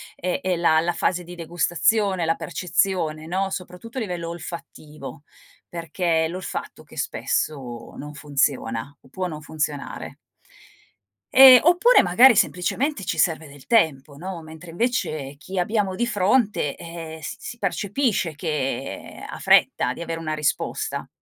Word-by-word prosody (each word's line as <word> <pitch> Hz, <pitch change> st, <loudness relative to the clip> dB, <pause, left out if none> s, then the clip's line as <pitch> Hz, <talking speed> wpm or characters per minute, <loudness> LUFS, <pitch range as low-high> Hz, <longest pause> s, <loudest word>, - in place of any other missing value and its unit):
è 180 Hz, 0 st, -2 dB
è 185 Hz, -1 st, 0 dB
la 165 Hz, -2 st, +3 dB
la 175 Hz, +1 st, 0 dB
fase 180 Hz, +1 st, 0 dB
di 175 Hz, +1 st, -10 dB
degustazione, 175 Hz, +3 st, +1 dB
la 165 Hz, 0 st, +2 dB
percezione, 165 Hz, -1 st, -1 dB
no, 190 Hz, +3 st, -1 dB
soprattutto 185 Hz, +7 st, -7 dB
a -, -, -1 dB
livello 175 Hz, -5 st, -4 dB
olfattivo, 155 Hz, -4 st, -9 dB, 0.5 s
perché 165 Hz, 0 st, 0 dB
è -, -, 0 dB
l'olfatto 180 Hz, +2 st, -6 dB
che -, -, -16 dB
spesso 130 Hz, -6 st, -2 dB
non 150 Hz, +1 st, -8 dB
funziona 140 Hz, -3 st, -1 dB
o -, -, -20 dB
può 185 Hz, +6 st, -3 dB
non 155 Hz, -3 st, -7 dB
funzionare. 150 Hz, -2 st, -4 dB, 1.2 s
Ehm, 260 Hz, -1 st, +11 dB
oppure 360 Hz, +10 st, +6 dB
magari 235 Hz, +8 st, +7 dB
semplicemente 210 Hz, -, 0 dB
ci -, -, -2 dB
serve 160 Hz, -2 st, +1 dB
del 140 Hz, -1 st, -15 dB
tempo, 155 Hz, -, +2 dB
no, 180 Hz, +1 st, -6 dB
mentre 160 Hz, +2 st, -11 dB
invece 165 Hz, -, -2 dB
chi 190 Hz, +6 st, -8 dB
abbiamo 195 Hz, 0 st, 0 dB
di 240 Hz, -, 0 dB
fronte, 210 Hz, -, +1 dB
ehm, 165 Hz, -1 st, -8 dB
s 145 Hz, -, -6 dB
si 235 Hz, -, -7 dB
percepisce 200 Hz, -, -1 dB
che 150 Hz, -4 st, -4 dB
ha -, -, -8 dB
fretta -, -, +4 dB
di -, -, -9 dB
avere 165 Hz, -1 st, -4 dB
una 155 Hz, -1 st, -3 dB
risposta. 150 Hz, -2 st, -2 dB
170 Hz, 145 wpm, -23 LUFS, 155-195 Hz, 1.2 s, Ehm